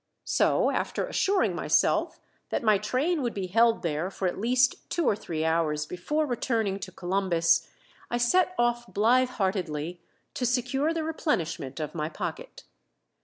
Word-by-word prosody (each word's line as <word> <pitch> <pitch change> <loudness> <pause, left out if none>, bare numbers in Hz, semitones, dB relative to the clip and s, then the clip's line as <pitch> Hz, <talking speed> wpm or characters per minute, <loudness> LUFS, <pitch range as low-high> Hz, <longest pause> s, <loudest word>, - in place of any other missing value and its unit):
So, - - +2
after - - -1
assuring 390 -1 +1
myself - - +1 0.3
that - - -2
my 215 -3 +4
train 275 - 0
would 240 -3 -2
be 195 -2 -2
held 225 +5 +3
there 165 +2 -1
for 195 -1 -2
at 180 - -3
least 250 +4 +1
two 340 - 0
or - - +3
three 160 -5 -4
hours 160 -2 +1
before 295 - -1
returning 225 -6 -1
to 190 - -7
Columbus, 175 -3 +1 0.4
I 240 - 0
set 365 +10 +2
off 240 0 0
blithe 250 +5 +3
heartedly 180 -6 -2 0.3
to - - -4
secure 265 +5 0
the 330 -1 -2
replenishment 170 - -2
of 155 - -4
my 155 -2 -2
pocket. - - -6
210 Hz, 155 wpm, -27 LUFS, 170-255 Hz, 0.4 s, my